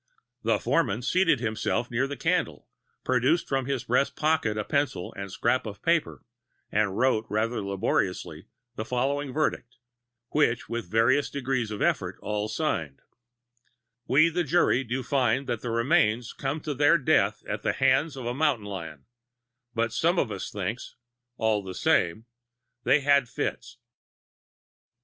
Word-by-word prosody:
The - - +2
foreman 120 -8 0
seated 170 -1 +3
himself 115 +1 -1
near 125 +3 +1
the 140 0 -6
candle, - - -1 0.4
produced 130 +7 +2
from 135 -1 -1
his 135 -4 -1
breast 135 +3 +1
pocket 155 -9 +1
a 105 - -1
pencil 140 -8 -1
and 100 -1 -7
scrap 120 +4 0
of 100 -1 -9
paper, 170 -1 0 0.5
and 105 -2 +1
wrote 120 -3 +2
rather 115 +3 -1
laboriously 90 -4 -2 0.3
the 110 - -3
following 135 +4 -1
verdict, 125 -4 -2 0.5
which 120 -6 +1
with 115 -5 -4
various 125 +7 +3
degrees 130 -4 -2
of 105 -1 -3
effort - - 0
all 105 0 -2
signed: 95 - -2 1.1
"We, 155 +5 +5
the 175 +2 0
jury, 145 -4 +2
do 125 +2 -3
find 130 0 +1
that 115 - -3
the 120 - -4
remains 115 -2 +2
come 140 +3 -3
to 150 - -3
their 145 +5 +4
death 145 - +2
at - - -3
the - - 0
hands 135 +3 +2
of 130 - -6
a 120 - -1
mountain 135 -6 +1
lion, 85 -8 -7 0.7
but 115 0 0
some 170 +8 +2
of 125 -9 +1
us 100 - -5
thinks, 100 +4 -5 0.4
all 110 -2 +1
the 95 -2 -8
same, 90 +7 +1 0.6
they 150 - +4
had 140 -2 +3
fits." 125 0 -4
125 Hz, 150 wpm, -27 LUFS, 110-140 Hz, 1.1 s, We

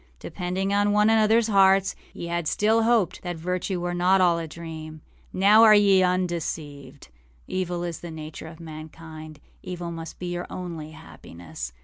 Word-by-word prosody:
âDepending 185 +1 -3
upon 205 +1 +2
one 210 +1 +4
anotherâs 225 +1 +4
hearts, 195 -2 +4 0.2
ye - - -7
had 170 -1 -2
still 220 +7 +2
hoped 225 -6 +1
that 175 -2 -5
virtue 180 +2 -3
were 175 0 -3
not 180 +2 +3
all 175 -2 +3
a 165 - -5
dream. 160 -1 -9 0.3
Now 205 +4 +5
are 220 -2 +8
ye 200 -2 +5
undeceived. 160 -6 -3 0.4
Evil 180 -2 -3
is 170 -2 -4
the 175 - -8
nature 155 0 -8
of 160 0 -12
mankind. 155 -1 -10 0.2
Evil 175 -1 -6
must 165 -1 -8
be 180 - -7
your 175 0 -4
only 170 -4 -6
happiness. 85 - -10
175 Hz, 160 wpm, -25 LUFS, 160-195 Hz, 0.4 s, are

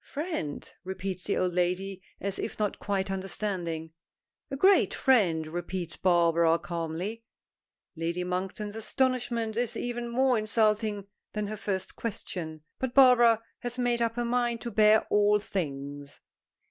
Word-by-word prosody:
"Friend?" 295 - -4 0.2
repeats 190 0 -4
the 205 - 0
old 180 -1 +1
lady, 180 +2 -1 0.2
as 200 -1 -3
if - - -4
not 210 -2 -1
quite 195 -1 -1
understanding. 185 -4 -3 0.6
"A 275 - -3
great 385 +7 +5
friend," 185 - +3
repeats 175 +1 -4
Barbara 170 -2 +3
calmly. 170 +7 -4 0.7
Lady 170 +2 -2
Monkton's 190 +3 -3
astonishment 235 -1 0
is 240 0 -1
even 240 0 -3
more 255 0 +3
insulting 215 -1 +1 0.3
than 210 -1 -2
her 215 +1 -4
first 195 -3 -3
question. 170 -8 -5 0.2
But 260 -1 -3
Barbara 240 -4 +6 0.2
has 245 0 -4
made 245 -1 +1
up 230 -1 +1
her 240 0 -1
mind 240 -1 0
to 235 - -4
bear 215 +1 +5
all 210 0 +5
things. 145 -8 -5
205 Hz, 135 wpm, -28 LUFS, 175-235 Hz, 0.7 s, Barbara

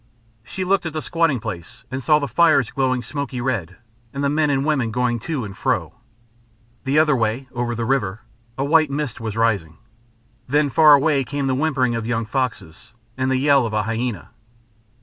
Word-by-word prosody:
She 150 +11 -5
looked 190 -2 +1
at 160 - -6
the 155 - -3
squatting 165 -6 +1
place 95 -7 -8
and 130 +1 -3
saw 150 +3 +4
the 145 -1 -2
fires 155 -9 +3
glowing 130 -2 0
smoky 140 0 -5
red, 105 -9 -3 0.3
and 140 +1 -4
the 140 - +1
men 150 0 +1
and 135 -1 0
women 140 -7 +1
going 120 +1 0
to 140 -1 -3
and 100 -1 -9
fro. 130 +5 -1 0.9
The 135 +3 +1
other 155 -2 +4
way, 115 +3 -1
over 120 -1 -2
the 115 0 -2
river, 115 -4 -1 0.4
a 135 - -1
white 155 0 +4
mist 140 -4 -4
was 110 -1 -4
rising. 100 -9 0 0.7
Then 145 +2 +1
far 155 +1 +7
away 140 -1 +2
came 140 +1 -3
the 135 - +1
whimpering 135 -3 +1
of 115 -1 -3
young 115 -1 -1
foxes 115 - -4 0.2
and 130 0 -1
the 130 - +2
yell 140 -2 +3
of 110 - -7
a 105 0 +1
hyæna. 115 -1 -3
130 Hz, 190 wpm, -21 LUFS, 115-145 Hz, 0.9 s, far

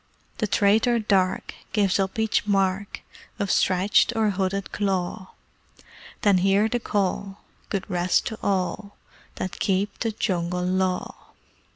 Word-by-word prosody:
The 215 - +1
traitor 215 +4 +3
Dark 195 -4 +1 0.2
gives 200 -2 +2
up 190 +1 -1
each 220 -1 +1
mark 195 0 0 0.4
Of 200 -1 -1
stretched 190 +4 +3
or 220 -2 +2
hooded 195 0 -2
claw; 190 -1 -2 0.9
Then 200 -3 +4
hear 195 +3 +3
the 240 +2 -1
Call: 200 -2 -2 0.3
"Good 195 -2 -3
rest 180 -2 +1
to 220 - -5
all 200 +1 -2 0.4
That 185 - -5
keep 195 +1 0
the 225 - -1
Jungle 180 -4 -1
Law!" 185 0 0
195 Hz, 130 wpm, -24 LUFS, 185-210 Hz, 0.9 s, Then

